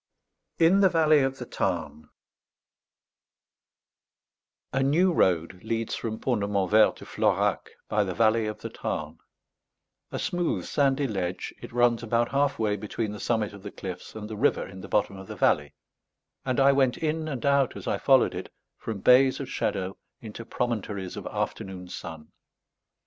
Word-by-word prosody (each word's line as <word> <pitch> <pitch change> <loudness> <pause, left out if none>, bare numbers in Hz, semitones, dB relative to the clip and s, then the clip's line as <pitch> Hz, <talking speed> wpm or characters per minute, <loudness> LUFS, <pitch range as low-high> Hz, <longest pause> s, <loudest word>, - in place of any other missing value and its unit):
IN 170 +4 +5
THE 195 -1 +6
VALLEY 155 -3 +4
OF 135 -1 0
THE - - -6
TARN 75 0 -3 2.6
A 135 - +1
new 170 +7 +3
road 90 - +1
leads 115 0 -2
from 110 -2 -3
Pont 120 -4 -1
de 100 - -1
Montvert 100 +2 +3
to - - -12
Florac - - 0 0.2
by 105 -1 +1
the 95 -2 -4
valley 115 -1 +3
of 105 - -6
the - - -5
Tarn; - - -4 0.9
a - - -3
smooth 175 -1 -1
sandy 140 0 +1
ledge, 95 -6 -3
it - - -9
runs 120 -1 +3
about 115 0 +1
half 140 0 +1
way 105 -2 +1
between 105 +1 -4
the 105 - -7
summit 110 -3 -1
of 100 - -11
the 100 - -7
cliffs 95 0 -8
and 105 -1 -6
the 110 - -6
river 135 +8 +1
in 95 -1 -10
the 100 - -8
bottom 100 -2 0
of 95 0 -10
the - - -7
valley; 75 0 +1 0.7
and 130 0 -1
I 135 +1 +6
went 135 -2 +2
in 155 0 -1
and 135 -5 -4
out, 140 -2 +2
as - - -9
I - - -1
followed - - +4
it, - - -6 0.3
from 110 -4 -5
bays 130 +3 +5
of 140 - -5
shadow 95 -1 -2 0.2
into 110 0 -8
promontories 105 -6 -3
of - - -6
afternoon 90 -2 -4
sun. 80 -3 -8
110 Hz, 170 wpm, -27 LUFS, 100-135 Hz, 2.6 s, THE